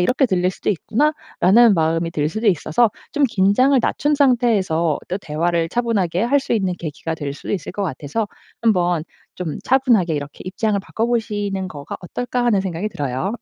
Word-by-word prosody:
이렇게 255 +9 +2
들릴 185 -4 +1
수도 - - -6
있구나.'라는 230 - +3
마음이 165 0 +1
들 150 -3 0
수도 220 +7 0
있어서 190 +5 +2 0.2
좀 295 - 0
긴장을 225 +8 +3
낮춘 295 +5 0
상태에서 210 - +2
또 180 - -1
대화를 165 0 -1
차분하게 200 -5 0
할 280 +4 +3
수 - - -4
있는 190 -5 0
계기가 160 0 -4
될 145 -3 -4
수도 - - -6
있을 190 -5 -3
것 200 - -3
같아서 160 - -3 0.4
한번 180 -7 +2 0.3
좀 170 -5 -4
차분하게 240 - +3
이렇게 145 -1 -6
'입장을 205 +2 0
바꿔보시는 205 -4 -2
거가 145 -5 -7
어떨까?' 245 +6 -3
하는 210 -5 +3
생각이 185 +2 -3
들어요. 145 +2 -3
190 Hz, 385 characters per minute, -20 LUFS, 165-230 Hz, 0.4 s, 있구나.'라는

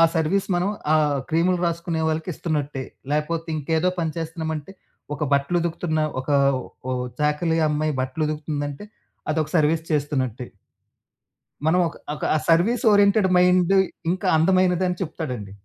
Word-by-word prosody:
Service 165 +5 +1
మనం 180 +3 +1 0.2
ఆహ్, 150 -2 +3
క్రీములు 175 +3 +2
రాసుకునే 170 -1 -2
వాళ్ళకిస్తున్నట్టే. 155 -4 -2 0.3
లేకపోతే 160 +3 -1
ఇంకేదో 160 +4 0
పని 160 -2 -1
చేస్తున్నామంటే 160 -1 -4 0.4
ఒక 145 - -3
బట్టలు 140 +5 +1
ఉతుకుతున్న, 165 -1 -1 0.2
ఒక 130 - -9 0.6
ఓ - - 0 0.3
చాకలి 150 +3 +1
అమ్మాయి 150 +1 0
బట్టలు 130 +4 -2
ఉతుకుతుందంటే 150 +1 -4 0.5
అదొక 155 -1 -1
సర్వీస్ 160 +1 +2
చేస్తున్నట్టే. 130 -5 -1 1.2
మనం 170 +3 +3
ఒక, 160 - -8 0.2
ఒక - - -5 0.2
సర్విస్ 195 +10 +3
ఓరియెంటెడ్ 205 -1 +4
మైండ్ 180 0 +4 0.4
ఇంకా 185 - -2
అందమైనది 185 +2 +3
అని 180 -1 -3
చెప్తాడండి. 125 - -5
160 Hz, 125 wpm, -23 LUFS, 150-175 Hz, 1.2 s, ఓరియెంటెడ్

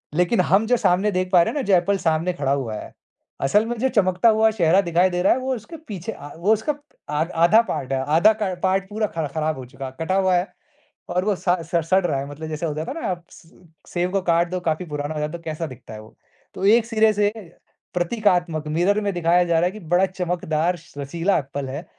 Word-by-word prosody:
लेकिन 180 +5 +3
हम 195 +4 +3
जो 245 - +3
सामने 195 +1 +2
देख 185 0 -1
पा 180 - +6
रहे - - -1
है - - -4
ना 285 - 0
जो 195 - +3
एप्पल 195 +3 +2
सामने 165 0 0
खड़ा 140 -6 -1
हुआ 130 -6 -1
है। - - -8 0.5
असल 205 +11 +3
में 240 +1 -3
जो 265 - +2
चमकता 190 -2 +3
हुआ 220 0 +4
चेहरा 180 -3 +3
दिखाई 175 +1 +2
दे 180 -1 -2
रहा - - +4
है 255 - -2
वो 260 0 -2
उसके 285 - -9
पीछे 200 0 -5
अ, 145 - -10
वो 195 +6 +3
उसका 220 +8 -1
प 290 - -19 0.3
अ 150 +1 +1
आधा 170 +7 +5
पार्ट 130 -5 -3
है 135 - 0 0.2
आधा 205 +7 +6
क 190 -3 0
पार्ट 190 +1 +1
पूरा 215 +1 -1
ख 155 - 0
ख़राब 155 -1 -1
हो 130 - -7
चुका 130 +2 -9
है, 130 - -6
कटा 165 +4 -1
हुआ 190 -1 +3
है 175 +2 +1 0.6
और 180 +2 0
वो 210 -1 +1
स - - -15 0.3
स 170 -1 +2
सड़ 190 -1 +3
रहा 140 -5 0
है। 140 - -5
मतलब 155 +2 -7
जैसे 155 +2 -3
हो 155 - -2
जाता 155 - -4
है 325 +4 -6
ना - - -2
आप 175 -1 -5
स 165 - -17 0.4
सेब 175 +1 -1
को 195 - 0
काट 170 -1 +2
दो 185 - -1
काफ़ी 160 +3 -2
पुराना 150 -1 -4
हो - - -3
जाता 150 +3 -3
तो 165 - -19
कैसा 160 0 -4
दिखता 125 -4 -11
है 110 - -8
वो। 110 - -17 0.4
तो 190 - -3
एक 225 +3 +5
सिरे 220 -1 +3
से 205 0 +2 0.6
प्रतीकात्मक 175 -4 0
मिरर 180 +7 +1
में 200 -1 -1
दिखाया 175 0 +3
जा 170 -1 0
रहा 170 - +2
है 180 - 0
कि 215 - -10 0.2
बड़ा 190 +2 +4
चमकदार 175 -2 -1 0.2
रसीला 165 +7 0
एप्पल 140 -1 -5
है। 145 +6 -6
180 Hz, 255 wpm, -22 LUFS, 155-200 Hz, 0.6 s, पा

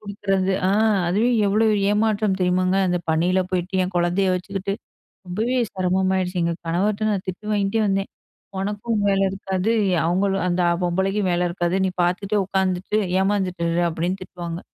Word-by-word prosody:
குடுக்குறது. 195 -2 -1 0.2
அ, - - +2 0.4
அதுவே 215 +7 +2 0.2
எவ்வளவு 215 +2 +3 0.2
ஏமாற்றம் 210 -2 +1
தெரியுமாங்க? 185 +1 +2
அந்த 180 0 +1
பனில 180 +4 +2
போயிட்டு, 185 +1 0
என் 180 0 -6
கொழந்தைய 175 +3 +1
வச்சுக்கிட்டு, 195 +1 -4 0.5
ரொம்பவே 225 +8 -1 0.2
செரமமாயிடுச்சு, 185 0 0
எங்க 170 0 0
கணவர்ட்ட 205 +5 0
நான் 195 -2 -2
திட்டு 185 +3 -6
வாங்கிட்டே 205 +2 +1
வந்தேன். 195 0 -1 0.5
"ஒனக்கும் 210 +2 -2
வேல 195 0 +2
இருக்காது, 190 +2 -2 0.2
ய - - +3
அவங்களும் 195 +1 +1
அந்த 175 +1 0 0.2
பொம்பளைக்கும் 190 +2 0
வேல 175 0 +1
இருக்காது. 175 0 -1
நீ 185 - 0
பார்த்துட்டே 195 +4 0
உட்காந்துட்டு, 190 +2 0 0.2
ஏமாந்துட்டு 190 -3 0
இரு." 175 +1 +1
அப்டின்னு 180 +4 -2
திட்டுவாங்க! 170 -2 -6
190 Hz, 145 wpm, -22 LUFS, 180-200 Hz, 0.5 s, எவ்வளவு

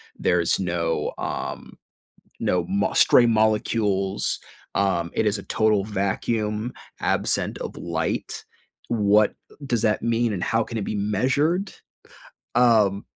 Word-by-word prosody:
There's 85 0 +1
no, 85 -3 -1
um - - -5 0.7
no 90 -2 +1
mo 100 +1 0
stray 120 - +5
molecules. 105 -3 +1 0.4
Um, 90 -4 0
it - - 0
is 105 0 +1
a 100 - -8
total 105 -2 +1
vacuum 105 +3 -2 0.3
absent - - 0
of - - -6
light. 85 -1 -3 0.5
What 105 -2 +3 0.3
does 120 -4 -1
that 105 -2 +2
mean 115 -1 +1
and 90 - -3
how 115 0 +1
can 115 - -6
it 105 - -2
be 105 - -3
measured? 135 - 0 0.8
Um, 110 -5 +3
105 Hz, 125 wpm, -24 LUFS, 95-115 Hz, 0.8 s, stray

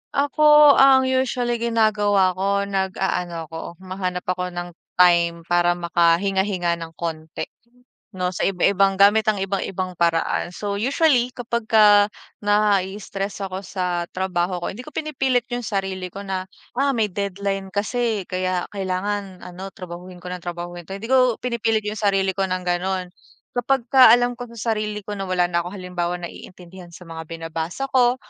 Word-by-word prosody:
Ako, 295 +1 +6
ang 270 -1 +7
usually 255 -2 0
ginagawa 210 -4 +2
ko 200 +2 0
nag-aano 190 -3 -2
ako 165 +2 -8
humahanap 185 -1 -4
ako 180 0 -2
ng 175 0 -4 0.3
time 170 -2 +4
para 175 +1 +2
makahinga-hinga 175 +1 +1
ng 165 -1 -8
k - - -22
onti 160 -1 -4 0.7
'no 180 -2 -2
sa - - -7
iba 190 -2 0
ibang 195 0 +2
gamit 205 +2 +6
ang 215 - +3
ibang 195 0 -1
ibang 185 -1 -4
paraan. 170 +1 0
So 200 +2 -3
usually 260 0 +3
kapag 235 -2 -3
ka 220 -1 +6 0.6
na-ii-stress 200 -1 0
ako 190 0 -5
sa 180 -2 -2
trabaho 180 -1 -1
ko, - - -1
hindi 240 +6 -9
ko 305 - -11
pinipilit 265 -5 0
yung 245 0 -2
sarili 195 -3 -3
ko 200 - -7
na, 190 -1 -3 0.3
"Ah, 280 0 +2
may 220 -2 +1
deadline 200 0 -3
kasi 215 0 -1
kaya 185 -1 -1
kailangan 195 0 -3
ano 180 +2 -8
trabahuhin 180 0 -9
ko - - -5
ng 180 - -5
trabahuhin 175 0 -6
to," 195 - -5
hindi 220 +3 -8
ko 255 -3 +4
pinipilit 225 -3 0
yung 215 +1 -4
sarili 195 -2 +2
ko 195 - +1
ng 185 0 -2
ganon. 180 0 -1 0.4
Kapag 245 +1 0
ka 260 -3 +9
alam 245 0 +1
ko 245 - -6
sa 225 +1 -1
sarili 210 -1 -3
ko 210 - -6
na 195 - -3
wala 180 -1 +2
na 170 0 +1
ako 170 - -5
halimbawa 180 -2 -3
naiintindihan 175 +1 -10
sa - - -12
mga 165 -1 -8
binabasa 165 +9 -4
ko 245 -1 +4
195 Hz, 165 wpm, -22 LUFS, 180-220 Hz, 0.7 s, ka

